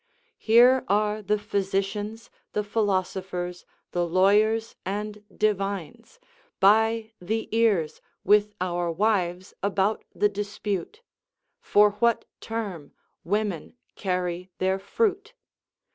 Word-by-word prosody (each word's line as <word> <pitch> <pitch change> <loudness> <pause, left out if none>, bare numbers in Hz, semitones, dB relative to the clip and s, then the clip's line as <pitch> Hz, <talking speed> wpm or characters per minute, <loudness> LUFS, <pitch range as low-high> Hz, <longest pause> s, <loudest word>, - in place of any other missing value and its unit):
Here 245 +3 +6
are 210 +1 +1
the 210 +1 +1
physicians, 205 +2 -2 0.2
the 210 - 0
philosophers, 185 -4 -2 0.2
the 175 - 0
lawyers, 205 +6 +3
and 210 +2 -4
divines, 205 - -2 0.4
by 220 +2 +4
the 220 +5 -2
ears 205 -9 +2 0.2
with 210 +1 +3
our 175 -1 -1
wives 185 -1 0
about 200 +1 0
the 210 - +3
dispute, 205 - -4 0.6
"For 210 - +4
what 235 -1 +3
term 205 -10 -5 0.3
women 200 -1 -2 0.2
carry 180 -1 -2
their 190 +1 0
fruit?" 430 - -1
205 Hz, 100 wpm, -26 LUFS, 185-220 Hz, 0.6 s, Here